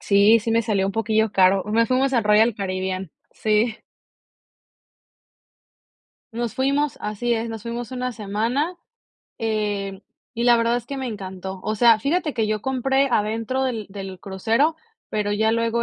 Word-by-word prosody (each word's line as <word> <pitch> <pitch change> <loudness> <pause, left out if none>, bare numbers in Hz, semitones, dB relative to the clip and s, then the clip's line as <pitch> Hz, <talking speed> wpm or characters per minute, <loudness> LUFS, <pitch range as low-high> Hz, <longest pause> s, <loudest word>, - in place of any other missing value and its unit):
Sí, 205 +3 +5
sí 225 - -3
me 230 +1 +3
salió 200 -4 0
un 195 - -2
poquillo 220 -1 +1
caro. 190 -1 +4
Nos 225 +2 +2
fuimos 265 +1 +2
al 230 -4 +2
Royal 215 +2 +4
Caribbean. 185 -2 -3 0.2
Sí. 215 +1 +1 2.6
Nos 235 -1 -3
fuimos, 280 +2 0
así 235 +3 -1
es, 230 +1 -3
nos 225 -1 -6
fuimos 235 0 -5
1 250 0 -3
semana, 230 - -1 0.6
em, 205 -3 -2 0.3
y 235 - -1
la 240 -1 +6
verdad 230 +1 +2
es 245 - -5
que 280 - -5
me 265 -1 -3
encantó. 190 -3 -6
O 215 - -1
sea, 230 0 +6
fíjate 305 +5 0
que 220 -3 0
yo 215 -1 -2
compré 265 +1 +1
adentro 225 +5 0
del 230 -5 -3
del 195 -2 -7
crucero, 225 +11 +1 0.4
pero 210 -1 -1
ya 220 +2 +2
luego 230 0 0
225 Hz, 160 wpm, -23 LUFS, 205-240 Hz, 2.6 s, la